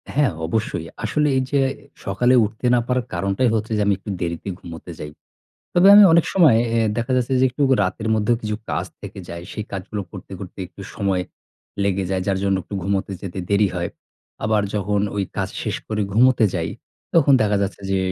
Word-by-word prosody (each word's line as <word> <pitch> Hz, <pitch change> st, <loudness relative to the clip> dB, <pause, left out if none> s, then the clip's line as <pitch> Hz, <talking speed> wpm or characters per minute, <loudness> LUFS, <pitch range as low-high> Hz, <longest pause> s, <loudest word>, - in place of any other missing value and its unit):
হ্যাঁ 140 Hz, -8 st, +3 dB, 0.2 s
অবশ্যই। 85 Hz, -4 st, -2 dB, 0.2 s
আসলে 150 Hz, +7 st, +1 dB
এই -, -, +2 dB
যে 140 Hz, -1 st, +3 dB, 0.4 s
সকালে 120 Hz, +6 st, +2 dB
উঠতে 110 Hz, +4 st, -4 dB
না 120 Hz, -, +3 dB
পারার 125 Hz, -1 st, 0 dB
কারণটাই 100 Hz, +7 st, +1 dB
হচ্ছে 110 Hz, +1 st, -2 dB
যে -, -, +1 dB
আমি 100 Hz, -, +3 dB
একটু 100 Hz, +2 st, -10 dB
দেরিতে 85 Hz, +2 st, -3 dB
ঘুমুতে 85 Hz, +1 st, -9 dB
যাই। 75 Hz, -, -6 dB, 0.6 s
তবে 180 Hz, +3 st, +6 dB
আমি 205 Hz, 0 st, +10 dB
অনেক 170 Hz, 0 st, +5 dB
সময় 160 Hz, -12 st, +6 dB
অ্যা 115 Hz, 0 st, +2 dB, 0.2 s
দেখা 120 Hz, +2 st, -1 dB
যাচ্ছে 125 Hz, +1 st, 0 dB
যে -, -, +5 dB
একটু 145 Hz, +4 st, -3 dB, 0.2 s
রাতের 105 Hz, +4 st, -2 dB
মধ্যেও 110 Hz, +2 st, +2 dB
কিছু 105 Hz, -1 st, -2 dB
কাজ -, -, -1 dB, 0.2 s
থেকে -, -, -9 dB
যায়। 85 Hz, 0 st, -6 dB
সেই 105 Hz, -, -4 dB
কাজগুলো 100 Hz, +1 st, -4 dB
করতে, -, -, -10 dB
করতে 95 Hz, 0 st, -9 dB
একটু 95 Hz, +2 st, -12 dB
সময় 95 Hz, -3 st, 0 dB, 0.6 s
লেগে 95 Hz, -1 st, 0 dB
যায় 95 Hz, -1 st, 0 dB
যার 95 Hz, -1 st, +1 dB
জন্য 95 Hz, -1 st, +2 dB
একটু 100 Hz, -, -9 dB
ঘুমুতে 100 Hz, +1 st, -1 dB
যেতে 95 Hz, -1 st, -6 dB
দেরি 100 Hz, 0 st, +4 dB
হয়। 85 Hz, -1 st, -2 dB, 0.6 s
আবার 105 Hz, -1 st, +2 dB
যখন 105 Hz, 0 st, 0 dB, 0.2 s
ওই 100 Hz, -, +1 dB
কাজ -, -, -1 dB
শেষ -, -, -2 dB
করে 105 Hz, -1 st, -1 dB
ঘুমুতে 120 Hz, +1 st, +5 dB
যাই 80 Hz, -1 st, -1 dB, 0.5 s
তখন 145 Hz, -4 st, +5 dB
দেখা 105 Hz, -1 st, +2 dB
যাচ্ছে 100 Hz, +1 st, -3 dB
যে, 95 Hz, -, +2 dB
105 Hz, 195 wpm, -21 LUFS, 95-120 Hz, 0.6 s, আমি